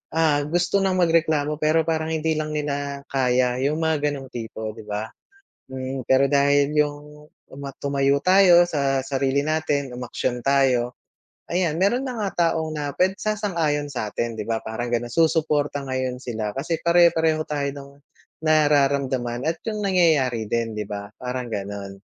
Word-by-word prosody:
ah, 155 -3 +3
gusto 175 +4 +1
ng 190 -1 +1
magreklamo 160 -4 +2
pero 155 +1 +3
parang 160 -1 -1
hindi 160 0 0
lang 155 0 -3
nila 140 -1 -3
kaya 125 -1 +1
yung 145 +3 +1
mga 150 -2 +1
ganong 135 -2 -7
tipo, 110 -2 -5
di 110 0 -11
ba. 105 +2 -4 0.6
Mm, 130 0 -4
pero 130 +2 +4
dahil 140 0 +3
yung, 150 0 -2 0.2
tuma 140 0 -8
tumayo 140 0 +1
tayo 185 -2 +6
sa 140 -4 0
sarili 135 +1 0
natin, 145 -4 -1
umaksyon 125 0 -3
tayo, 130 -3 +2 0.6
ayan 170 -3 +1
meron 235 +9 +1
na 250 -2 -4
nga 200 - 0 0.3
taong 160 -1 -2
na 145 -2 -3
pwed 190 +4 +1
sasang-ayon 170 -9 -1
satin 115 -2 -3
di 105 - -4
ba, 115 -1 -2
parang 120 +2 -3
ganon. 120 0 -2
Susuporta 150 -1 +1
ngayon 130 -1 -3
sila 110 -3 -4
kasi 160 +5 -2
pare-pareho 165 -2 +3
tayo, 145 -2 -3
ng 140 -1 -10 0.6
nararamdaman 140 -5 +2
at 165 - -5
yung 215 -2 -2
nangyayari 155 - +2
din 115 +1 -1
di 105 - -3
ba, 100 0 -6
parang 125 -1 -4
ganon. 100 -1 -5
140 Hz, 155 wpm, -23 LUFS, 125-160 Hz, 0.6 s, tayo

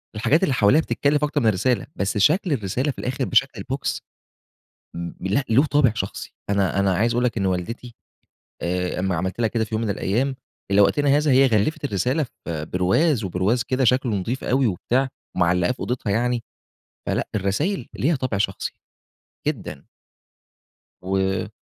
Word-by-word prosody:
الحاجات 140 - +2
اللي 170 - +2
حواليها 125 +6 +4
بتتكلف 145 -1 0
أكتر 150 - 0
من 115 - +2
الرسالة، 110 +4 +1
بس 95 +2 -1
شكل 155 - +3
الرسالة 125 +4 -1
في - - -11
الآخر 130 +1 -2
بشكل 135 +2 +3
البوكس 135 +7 -3 0.9
م 85 0 -4
لأ، 100 +9 +1
له 130 +7 +5
طابع 145 -6 +3
شخصي. 100 -4 -5 0.2
أنا 100 -1 +1
أنا 100 -1 +2
عايز 115 +6 +2
أقول 120 +1 +1
لَك 120 -2 -1
إن 100 - 0
والدتي 115 +6 -3 0.7
آآ، 90 +1 -1
أما 95 -1 0
عملت 95 +6 -3
لها 115 - +3
كده 115 -1 0
في 110 - -4
يوم 110 - -1
من 110 - -1
الأيام 120 +7 0 0.4
إلى 100 +1 +5
وقتنا 145 +8 +3
هذا 150 -1 +2
هي 135 +1 +6
غلفت 115 +7 +1
الرسالة 130 - 0 0.2
في 80 -3 -3
برواز، 105 - +1
وبرواز 95 +6 0
كده 130 +1 0
شكله 125 0 +2
نضيف 115 +7 -3
أوي 130 0 +2
وبتاع 125 +7 0 0.3
ومعلقاه 90 +1 +2
في 125 - -7
أوضتها 125 -3 -3
يعني، 120 +2 0 0.6
فلأ، - - -1
الرسايل 115 - -1
ليها 155 +5 +1
طابع 130 -6 -2
شخصي. 95 -1 -2 0.8
جدًا. 95 - -5 1.1
و 95 0 -1
115 Hz, 165 wpm, -23 LUFS, 95-135 Hz, 1.1 s, هي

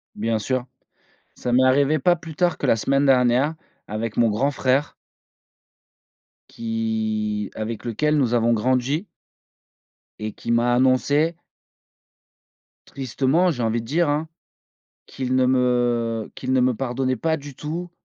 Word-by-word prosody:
Bien 110 0 -1
sûr, 130 +3 -2 0.7
ça 125 - -3
m'est 130 +1 +5
arrivé 140 +3 +3
pas 175 +6 +3
plus 165 -2 -10
tard 175 -1 +1
que - - -3
la - - +4
semaine 140 +5 +1
dernière, 130 +3 +3 0.3
avec 110 +1 -4
mon 115 -2 +4
grand 130 +7 +1
frère. 135 +2 0 1.6
Qui 110 -2 -2
avec 110 0 -5
lequel 150 +6 +1
nous 125 -4 +1
avons 120 0 +3
grandi 130 - 0 1.1
et 110 0 -4
qui 115 - -5
m'a 120 +1 +3
annoncé 145 +6 +2 1.5
tristement, 140 +7 +1
j'ai 125 -5 -4
envie 115 +1 0
de - - -11
dire 160 +4 +1
hein. 150 +2 -1 0.8
Qu'il 130 -1 -3
ne 130 0 +3
me 120 -3 +1
qu'il 130 0 -3
ne 130 - +4
me 125 -1 +2
pardonnait 130 +1 -1
pas 160 -1 0
du 145 -2 -10
tout 165 +5 -5
130 Hz, 140 wpm, -23 LUFS, 115-145 Hz, 1.6 s, m'est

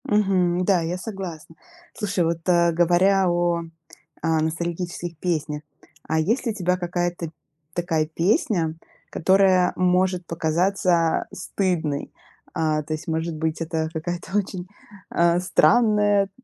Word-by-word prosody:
Мгм. 185 -4 +2
Да, 185 -3 +3
я 165 +2 -2
согласна. 180 -6 -7 0.4
Слушай, 200 -5 -1
вот, 165 0 0
а, 170 -1 +4
говоря 180 +3 +3
о, 175 -1 +1 0.6
а, 160 -1 +1
ностальгических 170 +1 -3
песнях. 155 -3 -2 0.5
А 160 - +1
есть 225 +12 0
ли 230 - +1
у - - -13
тебя 180 -2 0
какая-то 175 -1 -2 0.4
такая 165 -3 0
песня, 170 - +1 0.3
которая 185 0 +3
может 180 0 +1
показаться 170 +1 +1
стыдной? 170 -6 -2 0.4
А, 155 -3 0
то 155 +1 -4
есть, 155 - -6
может 160 0 -2
быть, 160 +1 -2
это 160 -1 -2
какая-то 175 +4 -3
очень, 185 -3 -3 0.4
а, 170 0 +3
странная, 205 0 +3
175 Hz, 125 wpm, -23 LUFS, 165-185 Hz, 0.6 s, а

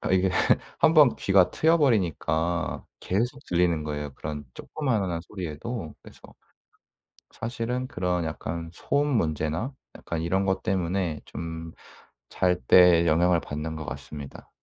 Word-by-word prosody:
아 - - -3
이게 95 0 +3 0.5
1 160 0 +5
번 150 -6 +6
귀가 95 -2 +4
트여 165 +1 +3
버리니까 85 - 0 0.2
계속 120 +8 -1
들리는 85 -3 +1
거예요 75 -2 -4
그런 75 -1 -6
조그마한 105 - -2
소리에도. 90 +2 -6
그래서 - - -15 1.1
사실은 120 +2 -3
그런 90 -1 -1
약간 80 +1 -5
소음 145 +10 0
문제나 80 - -1 0.2
약간 85 -1 -4
이런 95 +4 +1
것 95 -1 0
때문에 90 -3 -1
좀 80 0 -7 0.6
잘 90 -1 +1
때 85 -2 +7
영향을 85 +2 +3
받는 75 +2 -5
것 80 - -6
같습니다. 75 -2 -8
90 Hz, 270 characters per minute, -26 LUFS, 80-105 Hz, 1.1 s, 때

